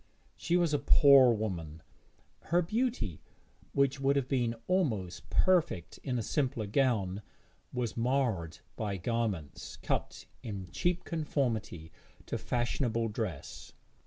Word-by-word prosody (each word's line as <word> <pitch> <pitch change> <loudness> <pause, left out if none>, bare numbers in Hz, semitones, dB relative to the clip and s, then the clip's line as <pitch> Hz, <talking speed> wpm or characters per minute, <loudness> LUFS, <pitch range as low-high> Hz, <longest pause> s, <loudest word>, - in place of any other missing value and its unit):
She 175 +1 +1
was 170 -3 +2
a 145 - +2
poor 140 -3 +7
woman; 85 -8 -3 0.6
her 175 +1 +2
beauty, 220 - -1 0.5
which 140 0 +2
would 135 +1 +2
have 135 -3 +1
been 120 -4 0
almost 115 - -1
perfect 175 - +1
in 130 -3 -2
a 115 - -1
simpler 130 -3 -1
gown, 105 -4 +1 0.5
was 125 -3 -2
marred 115 - 0 0.2
by 105 -3 -2
garments 100 - -3
cut - - -3 0.2
in 100 -5 -6
cheap 175 - 0
conformity 115 - -2 0.3
to - - -3
fashionable 120 -1 0
dress. 105 - -5
120 Hz, 120 wpm, -31 LUFS, 100-140 Hz, 0.6 s, poor